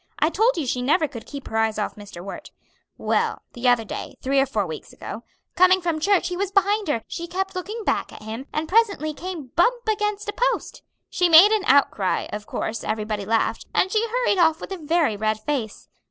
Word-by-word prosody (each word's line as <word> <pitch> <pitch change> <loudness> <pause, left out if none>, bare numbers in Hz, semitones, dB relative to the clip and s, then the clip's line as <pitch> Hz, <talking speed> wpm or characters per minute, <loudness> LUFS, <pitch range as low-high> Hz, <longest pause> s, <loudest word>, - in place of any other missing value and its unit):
I 310 - +2
told 445 +3 +2
you 315 - -1
she 250 0 -1
never 310 +5 +2
could 240 -5 -10
keep 280 -2 -8
her - - -7
eyes 220 -1 +1
off 210 - -2
Mr. 205 -4 -10
Wert. 195 - -8 0.5
Well, - - 0
the 245 +1 -2
other 245 -2 +3
day - - -6
three 275 +1 +1
or 270 - +3
four 215 -6 -1
weeks 160 -3 -8
ago 225 - -8 0.3
coming 370 +1 +5
from 335 -3 -1
church 385 +2 +2
he 360 - -3
was 390 +1 -1
behind 405 +1 +2
her; 230 -7 -1
she 340 0 -5
kept 380 +3 -3
looking 415 +5 -5
back - - 0
at - - -12
him, 225 +5 -6
and 310 +1 -2
presently 395 -6 +2
came 325 -6 -7
bump 470 +9 +4
up 435 - +3
against 420 0 -2
a 415 - -2
post. - - -1 0.3
She 360 -1 +2
made 340 +6 +9
an 430 -3 +1
outcry, 260 -8 +3
of 210 0 -6
course 220 +1 -3
everybody 215 -1 -3
laughed, 225 +1 0
and 375 - +2
she 440 +2 +1
hurried 480 -4 +1
off 320 -1 +4
with - - -8
a 385 - -3
very 315 -6 +1
red 215 +1 -1
face. 225 -3 -4
310 Hz, 220 wpm, -23 LUFS, -, 0.5 s, made